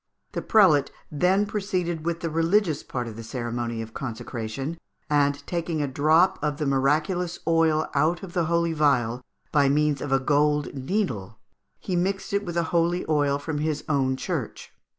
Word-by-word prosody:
The - - -3
prelate 170 -10 +4 0.2
then 185 +7 +2
proceeded 180 -6 -2
with 170 0 -1
the 165 - -2
religious 165 0 +2
part 125 -2 -4
of 110 - -7
the 115 - -7
ceremony 120 -1 -3
of 110 0 -11
consecration, 130 +4 -5 0.3
and 145 -1 +2
taking 170 -2 -2
a 145 - 0
drop 155 +7 +3
of 150 -1 -1
the 150 - -2
miraculous 150 +6 +1
oil 160 -2 +3
out 160 +5 +1
of 180 -2 -8
the 175 -3 +1
holy 170 0 +1
vial 125 -6 +2 0.3
by 140 -2 +4
means 150 0 +2
of 145 - -4
a 135 - +4
gold 150 +2 +1
needle, 135 - -2 0.4
he 185 - -3
mixed 195 +3 -1
it 200 +1 +1
with 175 -3 -5
the 170 - +2
holy 170 +1 +1
oil 145 -2 +2
from 145 +1 -4
his 150 -1 -1
own 135 -3 +1
church. - - -5
150 Hz, 170 wpm, -25 LUFS, 140-170 Hz, 0.4 s, prelate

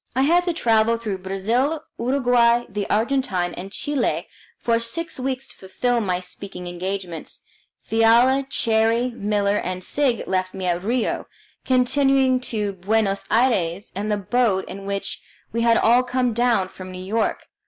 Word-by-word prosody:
I 260 - +3
had 345 +5 +3
to 350 - 0
travel 230 -4 +2
through 210 -5 -4
Brazil, 230 +11 -1 0.2
Uruguay, 240 -2 +3
the 205 0 -4
Argentine, 215 -6 0
and 190 +2 -8
Chile 290 +5 -1 0.3
for 230 -1 +1
six 270 +8 -3
weeks 260 0 -2
to - - -11
fulfil 235 +5 -1
my 180 -4 -1
speaking 180 0 -8
engagements. 175 -1 -5 0.4
Fiala, 240 +4 +4
Cherrie, 230 +2 +2
Miller, 205 -2 0
and 185 -1 -3
Sigg 265 +1 +1
left 185 -1 -1
me 190 - -4
at 175 0 0
Rio, 235 +3 -1 0.4
continuing 260 0 +3
to 210 -5 -3
Buenos 200 +1 0
Aires 205 -6 +1
in 205 +2 -3
the 210 - +1
boat 205 -1 +1
in 195 +1 -8
which 200 0 -3 0.3
we 230 - -1
had 230 0 +4
all 240 +3 +5
come 250 -1 0
down 235 -5 +2
from 185 0 -10
New 185 - -8
York. 220 +3 -1
225 Hz, 155 wpm, -22 LUFS, 195-250 Hz, 0.4 s, all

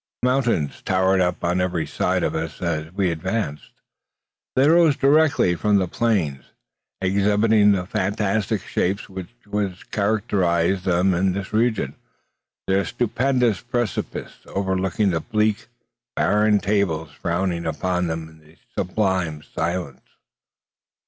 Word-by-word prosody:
Mountains 125 - +1
towered 95 0 +2
up 90 -1 -1
on 90 +1 +1
every 90 -3 -1
side - - 0
of - - 0
us 80 0 -4
as 80 -3 -2
we 95 -2 +1
advanced. 85 -2 -3 0.9
They 135 +2 +4
rose 165 -2 +5
directly 145 - +4
from 105 +4 +2
the 95 -2 +1
plains, 85 - 0 0.6
exhibiting 105 +2 +3
the 90 -2 -1
fantastic 100 +2 -1
shapes 95 +3 -1
which 100 0 -5
characterise 95 -4 +1
them 90 +1 +2
in 90 +1 +1
those 95 +1 -5
regions. 110 - +1 0.7
Their 95 +1 +2
stupendous 120 -1 0
precipices 120 -2 -3
overlooked 95 -1 -2
the 95 -6 +2
bleak, 110 0 0 0.5
barren 105 0 +3
tables 95 -7 0
frowning 85 +1 -2
upon 90 +3 -1
them 80 0 -4
in 80 0 -19 0.2
sublime 90 -6 -1
silence. 85 -6 -3
95 Hz, 115 wpm, -22 LUFS, 85-105 Hz, 0.9 s, rose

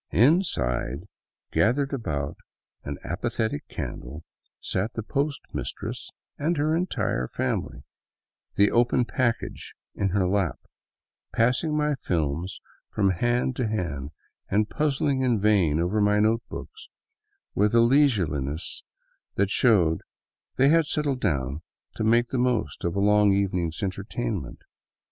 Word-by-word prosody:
Inside, 85 - +1 0.4
gathered 135 +5 +2
about 75 - -2 0.5
an 70 0 -5
apathetic 110 -2 -2
candle, 75 +6 -6 0.4
sat 100 +4 -2
the 115 - -3
post 140 +5 -1
mistress - - -5 0.3
and 160 +3 0
her 155 +2 +2
entire 165 - -1
family, - - -3 0.7
the 100 +1 +4
open 120 +1 +3
package 120 -2 -2 0.2
in 100 - 0
her 95 0 +1
lap 95 -2 0 0.4
— - - -59
passing 125 +7 +2
my 150 0 +2
films 85 - -2 0.3
from 100 -2 +2
hand 120 +7 0
to 125 - 0
hand 80 -10 -3 0.4
and 105 +2 +1
puzzling 140 -3 +1
in 125 -4 +2
vain 95 -7 +3
over 90 +5 +1
my 105 0 +3
notebooks, 115 - -2 0.6
with 105 +2 +2
a - - +7
leisureliness 90 - +1 0.5
that 100 0 +1
showed 90 -11 +3 0.5
they 135 +1 +4
had 165 0 +4
settled 140 -4 -1
down 70 -5 -1 0.3
to - - -2
make 120 +2 +3
the 130 - -1
most 125 -2 0
of 85 -1 -1
a - - +1
long 105 0 +5
evening's 90 -4 0
entertainment. 95 - -4
105 Hz, 125 wpm, -26 LUFS, 85-125 Hz, 0.7 s, a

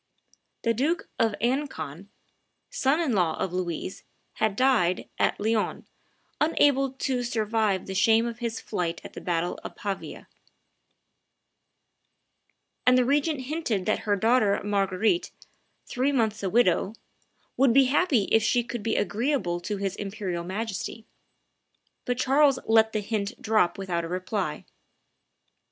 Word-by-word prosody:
The 230 - +2
Duke 295 +9 -1
of 225 -2 +2
Alencon, 200 - -2 0.6
son 300 - +1
in 315 -8 0
law 175 -6 +1
of 180 - -2
Louise, 180 0 -4 0.3
had 215 -2 +1
died 225 -8 +2
at - - +1
Lyons, 220 +1 -1 0.5
unable 280 -4 +3
to 265 -2 -1
survive 220 -4 0
the 190 - -5
shame 225 +3 +4
of 235 0 -5
his 230 -2 -3
flight 175 -5 -3
at - - -10
the - - -8
battle 175 0 -1
of - - -8
Pavia; 200 -3 -5 2.6
and 250 0 +5
the 250 - +3
regent 290 +2 +1
hinted 255 - -2
that 215 - +1
her 205 - +4
daughter 220 -1 +3
Marguerite, 205 - +1 0.6
three 260 +3 0
months 220 -5 0
a 195 - -1
widow, 205 -2 +2 0.6
"would 265 -1 +4
be 270 +3 +6
happy 270 - +2
if 225 - +5
she 240 +3 +2
could 240 -1 -5
be 225 +1 -1
agreeable 205 -3 0
to 205 +4 -4
his 195 -1 -2
Imperial 195 -4 -4
Majesty," 215 +3 -4 1.0
but 245 0 -1
Charles 275 +2 +4
let 220 0 +4
the 215 - -1
hint 205 -1 -3
drop 215 -5 +2
without 180 -3 -2
a - - -4
reply. 185 -1 -3
220 Hz, 140 wpm, -26 LUFS, 195-255 Hz, 2.6 s, be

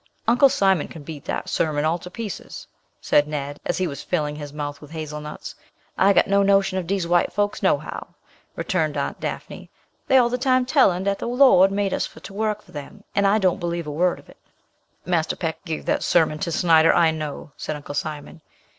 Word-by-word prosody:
"Uncle 245 +4 +6
Simon 190 - +2
can 160 - -11
beat 150 -2 -9
dat - - -3
sermon 150 -2 0
all 165 +2 +1
to 180 - -9
pieces," 215 +1 -7 0.4
said 145 0 +3
Ned, 145 -1 -5
as - - -1
he 185 - 0
was 140 -5 -5
filling 150 -4 -2
his 145 -1 -7
mouth 145 -1 -5
with 150 - -12
hazelnuts. 150 -1 -7 0.4
"I 195 +1 +4
got - - +4
no 200 0 +3
notion 195 -1 +3
of 175 - -6
dees 190 -1 0
white 175 0 +2
fokes, 205 0 -1
no - - +3
how," - - -7 0.5
returned 155 -5 -1
Aunt 140 - -3
Dafney. - - -6 0.4
"Dey 265 - +6
all 240 -2 +4
de 250 - -1
time 255 -1 +2
tellin' 250 - +3
dat 200 0 -1
de - - -4
Lord 240 -7 +5
made 200 -1 0
us - - -1
for - - -15
to - - -10
work 210 0 -2
for - - -20
dem, 150 +8 -9
and 200 0 +3
I 200 +2 +4
don't 190 -2 +1
believe 170 -2 -3
a 150 - -5
word 175 +4 +1
of - - -17
it." - - -17 0.7
"Marser 170 -2 0
Peck 165 -3 -4
give 160 -3 -4
dat - - 0
sermon 160 -3 +2
to 170 -1 -2
Snyder, 165 -1 +5
I 165 -2 +4
know," 155 -1 -6
said 155 - -4
Uncle 145 0 -8
Simon. 150 +1 -5
175 Hz, 215 wpm, -23 LUFS, 150-200 Hz, 0.7 s, Uncle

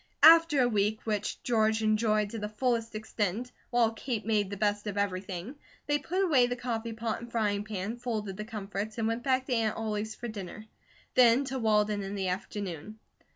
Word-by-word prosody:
After 330 -2 +8
a - - +3
week, 210 -1 +1
which 210 -2 -2
George 220 -2 +2
enjoyed 215 -1 +2
to 225 - -4
the 210 0 -4
fullest 230 0 -1
extent, 215 +2 -2 0.2
while 240 -2 +3
Kate 225 -1 -4
made 210 -3 +1
the 200 - -5
best 205 +1 0
of 205 -1 -3
everything, 190 +4 -3 0.3
they 290 0 +1
put 365 +6 -1
away 275 -9 +4
the 245 - -2
coffee 230 -2 -3
pot 225 0 -3
and 235 0 -9
frying 205 -3 0
pan, 210 +2 -4
folded 215 -5 -3
the 210 - -5
comforts, 210 0 -5
and 225 -1 0
went 230 +1 -1
back 260 0 +1
to 255 - -2
Aunt 225 -2 +1
Ollie's 215 -1 -3
for 240 - -6
dinner; 215 -1 -7 0.5
then 250 +2 +5
to 265 0 -3
Walden 210 -2 +2
in 195 +1 -5
the 190 -2 -1
afternoon. 190 +1 -5
220 Hz, 195 wpm, -29 LUFS, 205-240 Hz, 0.5 s, After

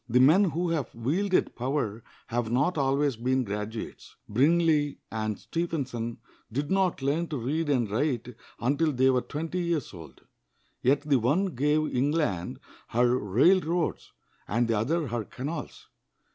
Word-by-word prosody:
The 125 +2 +4
men 160 +10 +6
who 175 -1 -1
have 150 -7 -2
wielded 180 - 0
power 120 -4 -2 0.2
have 115 -1 -2
not 145 +9 +2
always 140 -2 +1
been 130 +2 +1
graduates. 105 +1 -6
Brindley 150 +4 +3
and 110 -2 -2
Stephenson 130 -9 -3 0.3
did 140 +7 -2
not 190 -7 +1
learn 155 +5 +1
to 150 - -3
read 145 +6 -1
and 125 -5 +2
write 125 +2 -1 0.3
until 145 +6 +1
they 130 +1 +4
were 125 -1 +2
twenty 165 +7 -4
years 170 -9 -1
old; 80 -6 -12 0.6
yet 135 +3 +3
the 145 -3 +2
one 170 - +1
gave 150 +4 +1
England 130 - 0 0.3
her 120 +1 +2
railroads, 165 - +2 0.4
and 120 +2 +1
the 115 - +1
other 155 +9 0
her 120 -1 -2
canals. 145 +9 -6
135 Hz, 145 wpm, -28 LUFS, 120-160 Hz, 0.6 s, men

